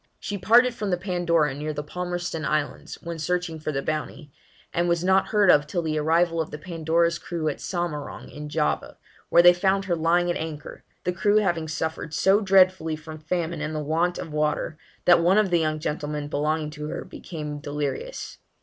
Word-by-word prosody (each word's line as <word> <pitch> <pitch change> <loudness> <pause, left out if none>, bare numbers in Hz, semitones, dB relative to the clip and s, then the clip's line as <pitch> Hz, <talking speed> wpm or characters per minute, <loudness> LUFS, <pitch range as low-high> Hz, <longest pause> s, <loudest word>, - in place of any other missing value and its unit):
She 205 - -4
parted 235 +6 +5
from 210 -4 -3
the 180 - +1
Pandora 175 -5 +1
near 150 +2 -4
the 150 0 -4
Palmerston 175 0 -4
Islands, 150 -1 -2
when 170 -1 -5
searching 175 0 -2
for 155 - -3
the 135 -1 -2
Bounty, 155 -1 -4 0.4
and 175 +1 +1
was 170 0 +1
not 190 +1 +3
heard 205 -4 +5
of 145 0 +4
till 175 +2 -2
the 155 -1 -1
arrival 165 +2 +2
of 160 - -4
the 150 - -6
Pandora's 170 +1 0
crew 165 -3 -3
at 145 - -5
Samarang, 170 -5 -4
in 150 0 -8
Java, 150 0 -1 0.3
where 170 - +6
they 175 0 +9
found 195 +2 +1
her 175 -3 +1
lying 170 +2 +2
at - - -2
anchor, 155 -2 -7 0.2
the 180 - 0
crew 205 +3 +2
having 170 -6 +1
suffered 160 0 -3
so 195 +6 +4
dreadfully 185 -5 +4
from 155 0 -10
famine 165 0 -2
and 155 0 -3
the - - -1
want 165 +4 0
of 160 - -6
water, 150 +1 0 0.3
that 175 -1 +6
one 180 +4 +4
of 210 -4 +3
the 175 - +4
young 155 -1 0
gentlemen 150 -1 -3
belonging 150 +1 -1
to 150 0 -6
her - - -5
became 150 -3 -7
delirious. 150 - -4
165 Hz, 195 wpm, -25 LUFS, 150-180 Hz, 0.4 s, they